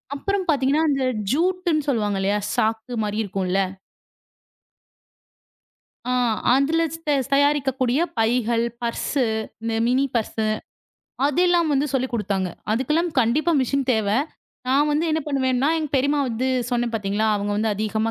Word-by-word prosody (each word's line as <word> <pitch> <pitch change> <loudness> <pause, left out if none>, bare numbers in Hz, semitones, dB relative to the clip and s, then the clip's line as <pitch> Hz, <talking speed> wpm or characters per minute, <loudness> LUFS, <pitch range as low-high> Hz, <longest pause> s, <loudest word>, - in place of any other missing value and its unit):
அப்புறம் 395 +6 -1
பாத்தீங்கன்னா, 285 +1 +2
அந்த 275 -2 +1 0.3
ஜூட்டுன்னு 340 -1 0
சொல்லுவாங்க 210 -6 0
இல்லயா. 200 +2 +1 0.2
சாக்கு 220 +2 -1
மாரி 210 +1 -1
இருக்கும்ல 190 -2 -2 2.5
ஆ - - +2 0.4
அதுல 310 +5 +2
ஸ்த 325 -2 -3 0.2
தயாரிக்கக்கூடிய 275 -2 +2 0.2
பைகள், 230 0 +1 0.2
பர்ஸு, 240 +3 -1 0.4
மி 225 - -1
மினி 260 +3 +2
பர்ஸு 220 -1 -1 0.8
அதெல்லாம் 345 +2 +2
வந்து 280 +1 +2
சொல்லிக் 260 -1 -1
கொடுத்தாங்க. 200 -4 -1 0.2
அதுக்கெல்லாம் 300 +9 0
கண்டிப்பா 275 +9 +2
மெஷின் 275 +2 0
தேவ. 220 -4 +1 0.6
நான் 285 +3 +3
வந்து 300 +3 +1
என்ன 315 +1 +1
பண்ணுவேன்னா? 265 -1 +1
எங்க 315 -2 -2
பெரியம்மா 280 +2 +2
வந்து 245 +3 -1 0.2
சொன்னேன் 240 -1 0
பாத்தீங்களா. 205 0 0
அவங்க 205 0 -2
வந்து 220 +1 +1
அதிகமா 220 +2 -1
260 Hz, 125 wpm, -23 LUFS, 220-295 Hz, 2.5 s, நான்